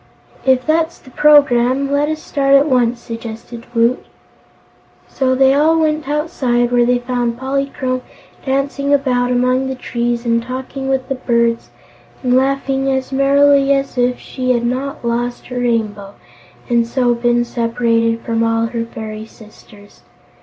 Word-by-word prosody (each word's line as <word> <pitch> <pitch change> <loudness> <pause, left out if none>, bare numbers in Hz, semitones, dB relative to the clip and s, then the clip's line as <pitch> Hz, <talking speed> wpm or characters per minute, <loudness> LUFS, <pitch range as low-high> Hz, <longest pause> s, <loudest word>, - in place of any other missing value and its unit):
"If 260 -1 +3
that's 320 +1 0
the 260 - -17
programme, 275 -2 +4
let 290 +1 +1
us 310 0 -3
start 275 -1 +2
at 275 +1 +5
once," 245 -4 +1
suggested 230 0 -8
Woot. 230 +2 +2 1.0
So 260 -1 0
they 265 +1 +4
all 315 +3 +3
went 305 -2 0
outside, 255 -5 0
where 240 -1 +3
they 245 0 +3
found 245 -1 -2
Polychrome 265 -1 -2 0.4
dancing 280 +1 0
about 250 -3 0
among 255 +1 +1
the 265 - -3
trees 240 -1 -3
and 230 0 +1
talking 260 +2 -5
with 265 -1 -1
the 270 - -1
birds 235 -2 0 0.5
and 250 -1 +1
laughing 270 0 0
as 265 0 -2
merrily 275 +1 +4
as 275 -1 -3
if 250 0 0
she 255 -1 -2
had 240 -1 -1
not 255 +1 -3
lost 240 +1 -2
her 250 -1 -4
Rainbow 215 -4 -2 0.5
and 235 -2 +1
so 245 0 +1
been 240 0 +1
separated 230 -1 0
from 230 -1 -1
all 225 0 +1
her 230 0 -3
fairy 220 -1 -8
sisters. 210 -2 -17
250 Hz, 150 wpm, -17 LUFS, 235-275 Hz, 1.0 s, at